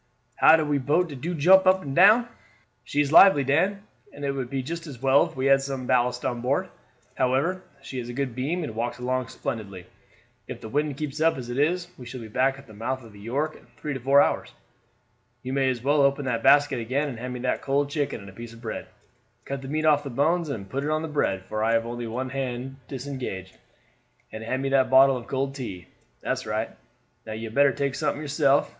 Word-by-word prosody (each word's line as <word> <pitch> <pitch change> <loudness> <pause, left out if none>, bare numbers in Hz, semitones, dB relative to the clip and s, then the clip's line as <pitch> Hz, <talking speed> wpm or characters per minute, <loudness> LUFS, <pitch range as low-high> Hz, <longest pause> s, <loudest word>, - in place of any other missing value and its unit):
how 160 - +7
de 150 -3 +1
boat 155 +6 +1
do 175 +4 -2
jump 185 +5 +6
up 185 0 +4
and 135 -1 -5
down." 220 +6 +6 0.6
"She 145 - 0
is 145 -1 -1
lively, 160 -4 +8
Dan, 185 +9 +1 0.3
and 145 0 -7
it 140 - 0
would 135 -3 -4
be 135 0 -2
just 165 +4 -6
as 135 -5 -9
well 135 +5 +4
if 165 - -14
we 130 - -2
had 135 0 +5
some 135 -2 -4
ballast 125 0 +1
on 120 -1 -2
board; 130 +3 0 0.4
however, 135 +9 0 0.2
she 130 - -6
has 120 0 -6
a - - -5
good 135 -1 -2
beam 150 +8 -2
and 145 - -5
walks 120 +2 -3
along 130 0 -2
splendidly. 100 -6 -6 0.6
If - - -7
the 110 - -9
wind 145 +2 -1
keeps 150 0 -4
as 160 -7 +1
it 125 - -2
is, 175 +4 +1
we 125 - -9
shall 125 +1 -7
be 110 -2 -9
back 135 +4 +1
at 135 - -14
the 110 - -15
mouth 130 +5 -4
of 115 -2 -14
the 100 - -14
York 140 +9 -2
in - - -18
three 145 +5 -4
or - - -4
four 135 +3 +5
hours. - - -2 0.9
You 130 +1 -4
may 135 -1 +2
as 120 -2 -3
well 145 +2 +3
open 140 0 +2
that 115 -3 -1
basket 140 -1 +4
again 130 +6 -1
and 125 -5 -6
hand 125 +1 -5
me 125 - -6
that 125 - -1
cold 140 +1 0
chicken 145 -7 -2
and 100 - -11
a - - -19
piece 115 +2 -9
of 115 - -14
bread; 110 - -5 0.6
cut 140 -1 -4
the 135 - -8
meat 155 +3 -1
off 150 -2 +4
the 140 - -5
bones 160 +6 +1
and 105 -8 -5
put 135 +7 -3
it 150 - -2
on 155 +1 0
the - - -3
bread, 95 -11 -1
for 110 +3 -3
I 115 +1 +2
have 115 0 +2
only 120 0 -5
one 125 +3 -4
hand 130 0 -4
disengaged; 125 -9 -6 0.8
and 110 - -7
hand 130 +4 -2
me 135 - 0
that 135 -2 +3
bottle 135 +1 +6
of 120 -2 -7
cold 135 0 -2
tea. 100 -10 -7 0.4
That's - - -3
right. 110 +1 -2 0.5
Now 110 - -7
you 110 +1 -5
had - - -13
better 140 +2 +5
take 140 -1 -2
something 145 0 -1
yourself. 145 -1 +2
135 Hz, 235 wpm, -25 LUFS, 120-145 Hz, 0.9 s, lively